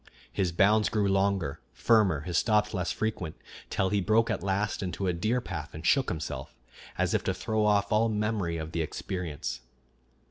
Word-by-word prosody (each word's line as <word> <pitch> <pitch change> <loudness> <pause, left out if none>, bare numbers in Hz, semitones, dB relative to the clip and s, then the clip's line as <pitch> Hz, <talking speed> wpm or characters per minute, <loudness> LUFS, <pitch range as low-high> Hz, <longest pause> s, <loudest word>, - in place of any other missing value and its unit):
His 90 -3 0
bounds 105 +5 +4
grew 105 -2 +1
longer, 95 -6 +1
firmer, 105 -10 +3
his 85 +2 -4
stops 105 +1 +2
less 90 -3 -1
frequent, 100 -7 -3 0.3
till 95 - 0
he 100 0 +1
broke 110 +4 +3
at - - -2
last 100 +1 -1
into 95 +1 -3
a 90 - +1
deer 110 +8 0
path 80 -10 -6
and 80 +1 -8
shook 135 +7 +3
himself, 80 -3 -5 0.4
as - - +1
if - - +1
to - - 0
throw 110 -1 -1
off 100 -1 +2
all 110 +2 +3
memory 105 -5 -1
of 80 0 -5
the 85 - -1
experience. 80 -6 -4
95 Hz, 180 wpm, -29 LUFS, 85-105 Hz, 0.4 s, bounds